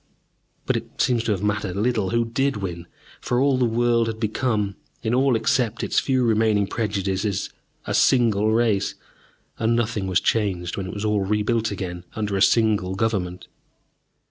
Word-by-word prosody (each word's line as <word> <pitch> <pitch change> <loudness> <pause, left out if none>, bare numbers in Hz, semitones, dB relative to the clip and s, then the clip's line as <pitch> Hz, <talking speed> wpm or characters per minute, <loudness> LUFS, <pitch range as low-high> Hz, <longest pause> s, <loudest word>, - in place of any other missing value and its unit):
But - - +1
it - - -9
seems 120 -3 +2
to 115 - +1
have 100 -1 -1
mattered 105 -3 -1
little 110 -2 0
who 115 +2 +1
did 135 +2 0
win, 85 -4 -5 0.3
for 125 0 -1
all 135 -1 +2
the 125 - +3
world 115 0 +2
had 110 -1 -4
become, 110 -3 -1 0.3
in 110 0 0
all 130 0 +3
except 120 -1 0
its - - +2
few 130 -2 +1
remaining 110 -3 +2
prejudices, 100 -2 -2 0.3
a - - -3
single 110 -4 +3
race, 110 -3 +1 0.6
and 115 +1 +2
nothing 110 -4 -1
was 90 -2 +2
changed 95 -6 -1
when 95 -2 -4
it - - -6
was 105 +1 -3
all 105 -1 +1
rebuilt 105 +3 0
again, 90 -3 -5
under 105 -2 -2
a 95 - 0
single 105 -3 +3
government. 95 -4 -2
110 Hz, 170 wpm, -23 LUFS, 100-115 Hz, 0.6 s, the